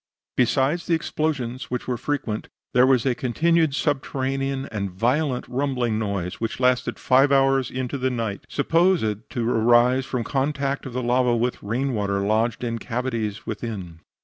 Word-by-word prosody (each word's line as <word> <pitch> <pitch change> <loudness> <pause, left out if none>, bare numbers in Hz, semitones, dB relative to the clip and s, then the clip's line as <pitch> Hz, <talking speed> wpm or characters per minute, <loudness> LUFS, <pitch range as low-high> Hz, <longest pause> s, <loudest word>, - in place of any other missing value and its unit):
Besides 135 +7 +1
the 170 - +3
explosions, 140 -6 -2
which 125 -1 -3
were 125 - 0
frequent, 120 -4 -3 0.3
there 125 +1 +5
was 130 -3 +3
a 130 - +3
continued 155 +5 +1
subterranean 135 -1 -1
and 100 -3 -2
violent 125 - 0
rumbling 125 -4 -1
noise, 100 -4 -3
which 115 - -3
lasted 125 -1 +1
five 135 +2 +4
hours 135 -1 +3
in 130 0 -3
the 130 0 -1
night, 115 -5 -3
supposed 150 - +1
to 120 -2 -2
arise 120 +3 +4
from 125 -3 -2
contact 140 +1 -1
of 125 - -8
the 125 0 -2
lava 125 0 +2
with 120 +2 -1
rain 125 +6 -1
water 100 -2 0
lodged 110 +4 0
in 115 -1 -2
cavities 115 -4 -3
within. 95 -8 -5
125 Hz, 155 wpm, -24 LUFS, 115-135 Hz, 0.3 s, there